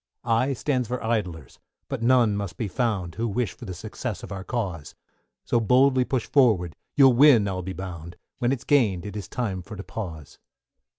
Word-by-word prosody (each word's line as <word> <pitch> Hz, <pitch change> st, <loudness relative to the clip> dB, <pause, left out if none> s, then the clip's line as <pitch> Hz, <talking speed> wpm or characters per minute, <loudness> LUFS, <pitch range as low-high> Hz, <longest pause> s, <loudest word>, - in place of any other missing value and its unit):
=I= 120 Hz, +4 st, +2 dB
stands 130 Hz, -2 st, -1 dB
for 125 Hz, +2 st, -4 dB
Idlers, 90 Hz, -, -3 dB, 0.3 s
but -, -, -4 dB
none 120 Hz, -3 st, +4 dB
must 100 Hz, -4 st, -4 dB
be 110 Hz, -, -2 dB
found, 100 Hz, -6 st, -1 dB
Who 115 Hz, +5 st, -2 dB
wish 110 Hz, -1 st, -1 dB
for -, -, -11 dB
the 95 Hz, -, -5 dB
success 110 Hz, +1 st, -6 dB
of -, -, -8 dB
our 95 Hz, -1 st, -5 dB
cause; 95 Hz, -11 st, -4 dB, 0.5 s
So 120 Hz, -, +2 dB
boldly 130 Hz, +3 st, +4 dB
push 125 Hz, -3 st, -1 dB
forward, 105 Hz, -, +3 dB, 0.2 s
you'll 135 Hz, -3 st, +7 dB
win 120 Hz, -5 st, +6 dB
I'll 95 Hz, -1 st, -2 dB
be 95 Hz, +1 st, -5 dB
bound, 90 Hz, -3 st, -7 dB, 0.2 s
When 120 Hz, -1 st, +1 dB
it's 130 Hz, -2 st, -2 dB
gained 110 Hz, -, +2 dB
it 105 Hz, -1 st, -7 dB
is 100 Hz, -4 st, -5 dB
time 100 Hz, -7 st, -3 dB
for 105 Hz, +5 st, -10 dB
to 100 Hz, -, -7 dB
pause. 85 Hz, -11 st, -7 dB
110 Hz, 190 wpm, -25 LUFS, 95-125 Hz, 0.5 s, you'll